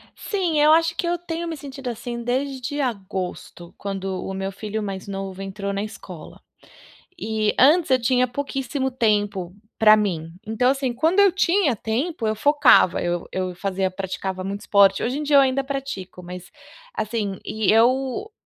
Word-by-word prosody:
Sim, 355 Hz, -7 st, -1 dB
eu 300 Hz, +1 st, +6 dB
acho 330 Hz, +1 st, +3 dB
que 340 Hz, -, -2 dB
eu 350 Hz, 0 st, 0 dB
tenho 340 Hz, 0 st, -5 dB
me 325 Hz, -2 st, -4 dB
sentido 270 Hz, -2 st, -7 dB
assim 235 Hz, +1 st, -5 dB
desde 265 Hz, +2 st, -2 dB
agosto, 190 Hz, -6 st, -5 dB
quando 195 Hz, -2 st, -4 dB
o 195 Hz, -, -4 dB
meu 195 Hz, 0 st, -3 dB
filho 215 Hz, +2 st, -5 dB
mais 195 Hz, -1 st, -5 dB
novo 195 Hz, -1 st, -5 dB
entrou 200 Hz, +1 st, -4 dB
na 200 Hz, +1 st, -2 dB
escola, 205 Hz, -5 st, -10 dB, 0.8 s
e 220 Hz, -6 st, -1 dB
antes 305 Hz, +3 st, +5 dB
eu 255 Hz, -1 st, +4 dB
tinha 250 Hz, +1 st, +2 dB
pouquíssimo 270 Hz, +1 st, -3 dB
tempo 205 Hz, -7 st, 0 dB, 0.2 s
para 215 Hz, -1 st, +7 dB
mim. 165 Hz, -6 st, -2 dB
Então, 235 Hz, +4 st, +2 dB
assim, 270 Hz, -2 st, -1 dB
quando 320 Hz, +10 st, +2 dB
eu 400 Hz, -2 st, +6 dB
tinha 355 Hz, -, +2 dB
tempo, 230 Hz, -, -2 dB
eu 215 Hz, -, 0 dB
focava, 285 Hz, -, +4 dB
eu 175 Hz, 0 st, -2 dB
eu 185 Hz, -1 st, -3 dB
fazia 190 Hz, 0 st, -1 dB
praticava 190 Hz, 0 st, -4 dB
muito 200 Hz, +2 st, -4 dB
esporte. 195 Hz, -1 st, +4 dB
Hoje 250 Hz, +4 st, -1 dB
em 300 Hz, -, -3 dB
dia 290 Hz, -1 st, +4 dB
eu -, -, +8 dB
ainda 270 Hz, 0 st, +1 dB
pratico, 270 Hz, -10 st, -6 dB
mas, 180 Hz, 0 st, -9 dB, 0.4 s
assim, 215 Hz, -, -3 dB
e 220 Hz, -3 st, +1 dB
eu, 260 Hz, -, +2 dB
225 Hz, 170 wpm, -23 LUFS, 195-275 Hz, 0.8 s, eu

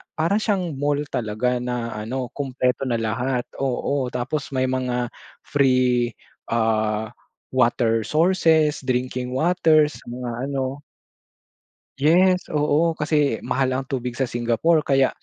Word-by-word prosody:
para 170 Hz, +7 st, +1 dB
siyang 190 Hz, -8 st, -1 dB
mall 145 Hz, 0 st, +1 dB
talaga 120 Hz, +2 st, -1 dB
na 120 Hz, -1 st, -3 dB
ano, 125 Hz, +4 st, -3 dB
kumpleto 130 Hz, -2 st, -1 dB
na 120 Hz, -, 0 dB
lahat, 120 Hz, +3 st, -1 dB, 0.2 s
oo. 135 Hz, +1 st, -1 dB
Tapos 135 Hz, +4 st, -3 dB
may 130 Hz, -1 st, 0 dB
mga 125 Hz, -2 st, -1 dB, 0.3 s
free, 125 Hz, -3 st, +2 dB, 0.4 s
ah, 110 Hz, -1 st, 0 dB, 0.4 s
water 115 Hz, -2 st, +2 dB
sources, 160 Hz, -2 st, +3 dB
drinking 125 Hz, -1 st, -2 dB
waters, 155 Hz, -1 st, +3 dB
sa -, -, -21 dB
mga 120 Hz, 0 st, -5 dB, 0.2 s
ano. 135 Hz, +1 st, -3 dB, 1.2 s
Yes! 180 Hz, +6 st, +4 dB
Oo, 150 Hz, +2 st, +2 dB
kasi 150 Hz, -6 st, 0 dB
mahal 130 Hz, 0 st, 0 dB
ang 135 Hz, 0 st, -3 dB
tubig 125 Hz, -3 st, -3 dB
sa 125 Hz, 0 st, -2 dB
Singapore. 120 Hz, +7 st, +1 dB
Kaya 135 Hz, -1 st, +3 dB
130 Hz, 120 wpm, -23 LUFS, 120-150 Hz, 1.2 s, Yes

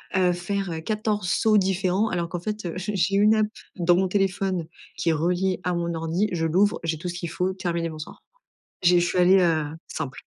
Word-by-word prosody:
heu, 180 Hz, -1 st, +3 dB
faire, 185 Hz, +1 st, -3 dB
heu, 160 Hz, -, -3 dB
14 210 Hz, -2 st, -1 dB
sauts 215 Hz, -1 st, +3 dB
différents 190 Hz, +2 st, +1 dB
alors 170 Hz, -2 st, -2 dB
qu'en 175 Hz, -, -4 dB
fait, 210 Hz, +1 st, -5 dB
heu, 170 Hz, -, -3 dB
j'ai 195 Hz, +3 st, -3 dB
j'ai 195 Hz, +2 st, +1 dB
une 210 Hz, +2 st, +5 dB
app 215 Hz, -1 st, +2 dB, 0.3 s
dans 175 Hz, -1 st, +3 dB
mon 190 Hz, +1 st, +2 dB
téléphone 190 Hz, -2 st, 0 dB, 0.3 s
qui 170 Hz, -, 0 dB
est -, -, +3 dB
reliée 180 Hz, +4 st, 0 dB
à 180 Hz, -, 0 dB
mon 170 Hz, 0 st, -2 dB
ordi, 165 Hz, +6 st, -1 dB
je 165 Hz, -2 st, -1 dB
l'ouvre, 190 Hz, +6 st, +2 dB
j'ai 165 Hz, -1 st, -1 dB
tout 175 Hz, +3 st, -5 dB
ce -, -, -4 dB
qu'il 170 Hz, -2 st, -4 dB
faut 185 Hz, +3 st, -1 dB
terminé, 170 Hz, -3 st, -2 dB
bonsoir». 155 Hz, -1 st, -9 dB, 0.6 s
J'ai 175 Hz, 0 st, +5 dB
je 175 Hz, -, +1 dB
suis 180 Hz, -, -2 dB
allée, 185 Hz, +2 st, +6 dB
heu, 165 Hz, -4 st, +2 dB, 0.2 s
simple. 140 Hz, -5 st, -5 dB
180 Hz, 220 wpm, -24 LUFS, 170-195 Hz, 0.6 s, allée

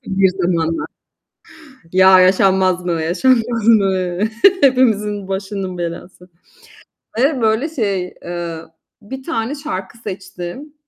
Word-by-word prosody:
bir 195 Hz, 0 st, +2 dB
zamanlar. 175 Hz, -3 st, -1 dB, 1.1 s
Ya, 190 Hz, 0 st, +7 dB
yaşanmaz 185 Hz, -1 st, +3 dB
mı, 180 Hz, -, -1 dB
yaşanmaz 225 Hz, +8 st, +1 dB
mı, 190 Hz, -5 st, +2 dB, 0.4 s
hepimizin 210 Hz, -7 st, +2 dB
başının 195 Hz, -1 st, -4 dB
belası. 175 Hz, +1 st, -7 dB, 0.9 s
Ve 270 Hz, 0 st, +1 dB
böyle 220 Hz, +7 st, +1 dB
şey, 200 Hz, -, -3 dB
eee, 175 Hz, -1 st, -5 dB, 0.4 s
bir 265 Hz, +6 st, -8 dB
tane 265 Hz, -3 st, -3 dB
şarkı 230 Hz, -9 st, -6 dB
seçtim 195 Hz, -, -8 dB
195 Hz, 100 wpm, -18 LUFS, 180-230 Hz, 1.1 s, Ya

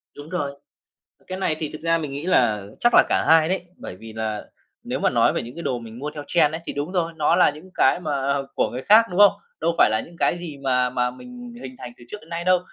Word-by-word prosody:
Đúng 145 Hz, +2 st, -10 dB
rồi, 155 Hz, -6 st, -2 dB, 0.8 s
cái 185 Hz, 0 st, -5 dB
này 160 Hz, -5 st, 0 dB
thì 155 Hz, -, -3 dB
thực 155 Hz, -, -8 dB
ra 165 Hz, 0 st, +2 dB
mình 150 Hz, -3 st, -5 dB
nghĩ 140 Hz, +4 st, -5 dB
là 110 Hz, -, +2 dB
chắc 240 Hz, -, +3 dB
là -, -, +8 dB
cả -, -, +1 dB
hai 160 Hz, -1 st, +6 dB
đấy, 190 Hz, 0 st, -1 dB
bởi -, -, -9 dB
vì 110 Hz, +3 st, -11 dB
là 110 Hz, -1 st, -3 dB, 0.4 s
nếu -, -, -3 dB
mà -, -, +2 dB
nói -, -, +3 dB
về -, -, -2 dB
những 120 Hz, -, -9 dB
cái 170 Hz, -, -7 dB
đồ 125 Hz, -7 st, -1 dB
mình 115 Hz, 0 st, -10 dB
mua 145 Hz, +3 st, -4 dB
theo 145 Hz, -1 st, -6 dB
trend 160 Hz, -3 st, +3 dB
ấy 160 Hz, -, -4 dB
thì -, -, -3 dB
đúng 145 Hz, +5 st, -4 dB
rồi, 170 Hz, -3 st, 0 dB
nó 155 Hz, +2 st, +2 dB
là 180 Hz, -, +5 dB
những 155 Hz, +6 st, -13 dB
cái 130 Hz, -, +3 dB
mà 140 Hz, -4 st, -1 dB, 0.2 s
của -, -, +1 dB
người 125 Hz, +2 st, -5 dB
khác, 215 Hz, +7 st, +6 dB
đúng 180 Hz, -, -4 dB
không? 205 Hz, -1 st, +8 dB, 0.3 s
Đâu 170 Hz, -, +1 dB
phải -, -, +6 dB
là 110 Hz, 0 st, +1 dB
những 170 Hz, -, -15 dB
cái 175 Hz, -, +1 dB
gì 165 Hz, -4 st, -7 dB
mà 125 Hz, -2 st, +2 dB
mà 125 Hz, -1 st, 0 dB
mình 245 Hz, -, -11 dB
hình -, -, -8 dB
thành 120 Hz, -, -8 dB
từ 120 Hz, -, -15 dB
trước -, -, -6 dB
đến 160 Hz, -, -18 dB
nay 170 Hz, 0 st, -4 dB
đâu, 185 Hz, 0 st, +4 dB
155 Hz, 280 wpm, -23 LUFS, 125-175 Hz, 0.8 s, là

